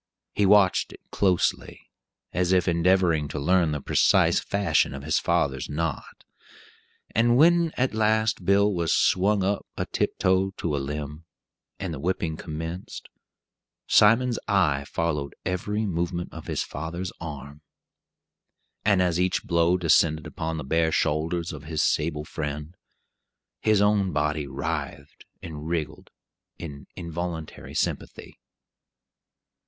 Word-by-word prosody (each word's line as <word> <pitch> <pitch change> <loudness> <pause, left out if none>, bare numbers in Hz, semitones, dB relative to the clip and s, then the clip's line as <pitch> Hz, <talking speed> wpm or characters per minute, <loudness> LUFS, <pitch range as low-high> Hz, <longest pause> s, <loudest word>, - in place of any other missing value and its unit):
He 100 - +2
watched 100 -2 +4
it - - -13
closely, 95 -3 0 0.5
as 90 +1 +1
if 90 -1 +3
endeavoring 85 -3 +2
to 75 - -5
learn 85 +2 +2
the 75 - -2
precise - - +3
fashion 95 -8 +1
of 70 - -8
his 80 - +1
father's 70 -7 0
knot; 80 0 -4 0.9
and 120 +2 +3
when 170 +2 +5
at 130 -1 +1
last 110 -2 +1
Bill 100 +2 +3
was 85 -3 +1
swung 100 +2 +2
up 100 +2 -1
a - - -1
tiptoe 95 +1 0
to 75 -4 -2
a - - -1
limb, 75 +3 -6 0.5
and 95 -4 -4
the 75 - -6
whipping 85 0 -1
commenced, 80 +3 -7 0.8
Simon's 115 +3 +4
eye 75 -9 +2
followed 75 -3 -2
every 105 +4 -2
movement 85 -1 -3
of - - -9
his - - -1
father's 85 +5 -5
arm; 70 -2 -8 1.2
and 100 -3 +3
as 90 -1 0
each 90 0 +1
blow 85 +1 +2
descended 80 -2 +3
upon 80 0 -4
the 75 - -4
bare 80 +4 +1
shoulders 80 +3 0
of 75 -1 -9
his 80 -1 -1
sable 75 -1 0
friend, 75 +2 -5 0.8
his 105 -2 +3
own 105 -2 +2
body 75 -1 -1
writhed 70 0 -5 0.2
and 80 -2 -7
"wriggled" 80 -3 -4 0.5
in 70 -4 -9
involuntary 85 -2 -6
sympathy. - - -3
85 Hz, 130 wpm, -25 LUFS, 75-95 Hz, 1.2 s, when